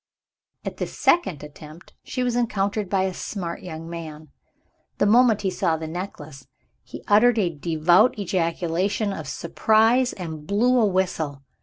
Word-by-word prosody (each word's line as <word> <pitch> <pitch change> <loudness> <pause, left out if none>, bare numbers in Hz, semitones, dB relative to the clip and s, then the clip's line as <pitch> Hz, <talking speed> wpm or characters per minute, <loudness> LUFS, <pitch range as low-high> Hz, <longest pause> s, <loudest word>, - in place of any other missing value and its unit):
At - - -5
this - - -5
second 190 - +2
attempt, 150 +3 -13
she 255 - -3
was 245 -1 0
encountered 210 -4 -1
by 190 -1 +1
a 190 -1 -1
smart 175 -3 -5
young 165 -3 -8
man. 160 -3 -8 0.7
The - - +2
moment 225 -1 +4
he 190 - 0
saw 175 -3 0
the 160 - -6
necklace, 155 -6 -8 0.3
he - - -11
uttered 225 +3 +5
a 185 -5 +1
devout 170 - +3
ejaculation 185 +2 -1
of 155 -7 -7
surprise 220 - +2
and 160 -4 -7
blew 245 +5 +3
a 220 - +4
whistle. 165 -7 -2
185 Hz, 150 wpm, -23 LUFS, 160-215 Hz, 0.7 s, uttered